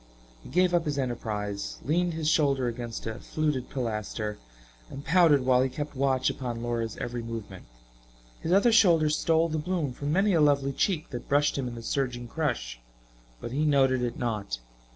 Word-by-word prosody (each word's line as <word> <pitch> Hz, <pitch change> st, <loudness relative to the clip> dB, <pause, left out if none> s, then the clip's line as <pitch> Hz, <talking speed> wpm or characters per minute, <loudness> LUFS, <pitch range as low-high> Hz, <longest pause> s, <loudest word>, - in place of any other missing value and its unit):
He -, -, -12 dB
gave 180 Hz, +1 st, +2 dB
up 170 Hz, -1 st, +2 dB
his 145 Hz, -2 st, -2 dB
enterprise, 105 Hz, -6 st, -3 dB
leaned 175 Hz, +4 st, +1 dB
his 160 Hz, -2 st, -2 dB
shoulder 140 Hz, -5 st, +2 dB
against 120 Hz, -1 st, -5 dB
a 110 Hz, -1 st, -4 dB
fluted 150 Hz, -5 st, -2 dB
pilaster 110 Hz, -3 st, -3 dB, 0.5 s
and 140 Hz, -, -8 dB
pouted 160 Hz, -6 st, +4 dB
while 130 Hz, -1 st, +4 dB
he 130 Hz, -, +1 dB
kept 145 Hz, +2 st, -5 dB
watch 130 Hz, -1 st, +1 dB
upon 120 Hz, -3 st, -3 dB
Laura's 115 Hz, -2 st, -2 dB
every 120 Hz, 0 st, -4 dB
movement. 115 Hz, -5 st, -7 dB, 0.8 s
His 165 Hz, -, -2 dB
other 200 Hz, +6 st, +5 dB
shoulder 170 Hz, -9 st, +5 dB
stole 165 Hz, +2 st, +2 dB
the 155 Hz, 0 st, -1 dB
bloom 155 Hz, -4 st, -2 dB
from 145 Hz, +3 st, -3 dB
many 195 Hz, +4 st, +3 dB
a 165 Hz, -, +4 dB
lovely 140 Hz, -2 st, +3 dB
cheek 165 Hz, +1 st, -1 dB
that 120 Hz, -, -7 dB
brushed 145 Hz, +1 st, +3 dB
him 135 Hz, -2 st, -2 dB
in 120 Hz, -, -6 dB
the 115 Hz, -, -8 dB
surging 125 Hz, -2 st, -2 dB
crush, 65 Hz, -, -2 dB, 0.6 s
but 115 Hz, -, -6 dB
he 145 Hz, +4 st, 0 dB
noted 135 Hz, -4 st, +3 dB
it 120 Hz, -1 st, -2 dB
not. 105 Hz, -, -2 dB
135 Hz, 180 wpm, -28 LUFS, 120-155 Hz, 0.8 s, other